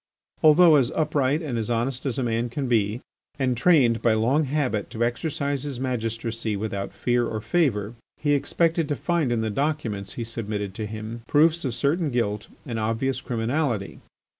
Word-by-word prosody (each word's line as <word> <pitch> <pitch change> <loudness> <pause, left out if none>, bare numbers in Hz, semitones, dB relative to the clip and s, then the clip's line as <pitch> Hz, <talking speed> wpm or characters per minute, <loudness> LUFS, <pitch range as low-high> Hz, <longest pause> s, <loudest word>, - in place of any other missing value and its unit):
Although 155 0 +7
as 130 -4 +2
upright 150 0 +1
and 125 -6 -2
honest 120 +4 -1
as 125 - -2
a 130 - 0
man 115 0 0
can 135 +2 -3
be, 110 0 +1 0.4
and 130 -3 +1
trained 125 -4 +4
by 115 -2 +3
long 130 +8 +2
habit 130 -7 -1
to 115 - -2
exercise 140 +2 -2
his 140 -3 -5
magistracy 115 -3 -2
without 100 -1 -3
fear 120 -1 0
or 110 - -3
favour, 110 -5 0 0.3
he 145 -1 +2
expected 165 +3 +1
to 145 - +1
find 165 -4 0
in 115 -2 +1
the 110 -1 -1
documents 115 -7 -2
he 120 - -4
submitted 105 -3 -4
to 105 +1 -4
him 110 +2 -6
proofs 160 +3 +3
of 125 -4 -2
certain 150 +5 +1
guilt 105 -5 -1 0.2
and 115 -5 -3
obvious 115 +4 -1
criminality. 120 -2 -2
120 Hz, 170 wpm, -25 LUFS, 110-145 Hz, 0.4 s, Although